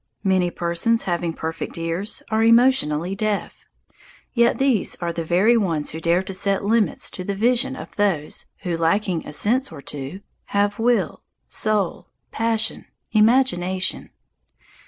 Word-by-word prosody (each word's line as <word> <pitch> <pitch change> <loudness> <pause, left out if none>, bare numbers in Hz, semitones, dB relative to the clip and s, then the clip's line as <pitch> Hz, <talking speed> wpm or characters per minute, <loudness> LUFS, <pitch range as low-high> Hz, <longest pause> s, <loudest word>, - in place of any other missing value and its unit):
Many 185 -2 +2
persons, 175 +7 0
having 175 -2 -1
perfect 160 +1 -5
ears, 165 +5 -3
are 220 0 +2
emotionally 225 - +4
deaf. 210 0 -2 0.8
Yet 235 -1 +3
these 265 -7 +1
are 170 -1 -3
the 165 - -3
very 185 +8 +3
ones 170 -9 0
who 160 - -6
dare 170 +3 +2
to 190 - -6
set 195 +1 0
limits 220 0 +1
to 185 - -6
the 200 +2 -3
vision 245 +5 +1
of - - -10
those 190 -8 -1 0.2
who, 175 -2 -1
lacking 170 +1 0
a - - -6
sense 250 - +1
or - - -9
two, 145 +7 -6 0.2
have 205 +1 0
will, 240 +1 +1 0.3
soul, 210 -4 -1 0.2
passion, 225 -1 0 0.2
imagination. 210 -5 +2
195 Hz, 140 wpm, -22 LUFS, 170-225 Hz, 0.8 s, emotionally